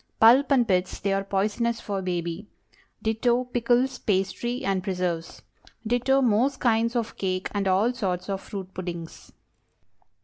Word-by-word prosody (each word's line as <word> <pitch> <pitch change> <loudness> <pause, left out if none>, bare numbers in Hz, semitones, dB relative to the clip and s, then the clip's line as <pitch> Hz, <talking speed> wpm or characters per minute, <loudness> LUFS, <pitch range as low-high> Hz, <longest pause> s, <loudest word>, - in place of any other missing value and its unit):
Pulp 245 +6 +6
and 250 -4 +4
pits, 185 -1 0
they 195 0 0
are 195 0 0
poisonous 215 +4 0
for 200 -3 -3
baby. 175 +1 -3 0.6
Ditto, 235 +3 +1
pickles, 245 +1 +1
pastry, 215 +6 -1
and 190 -2 0
preserves. 180 -3 -3 0.4
Ditto, 245 +4 +2
most 245 +4 +2
kinds 230 0 +2
of 230 -2 -2
cake 185 -1 -2
and 200 -1 0
all 200 +6 +3
sorts 185 -7 -2
of 195 -1 -3
fruit 190 -2 -7
puddings. 170 -2 -7
205 Hz, 140 wpm, -26 LUFS, 185-240 Hz, 0.6 s, Pulp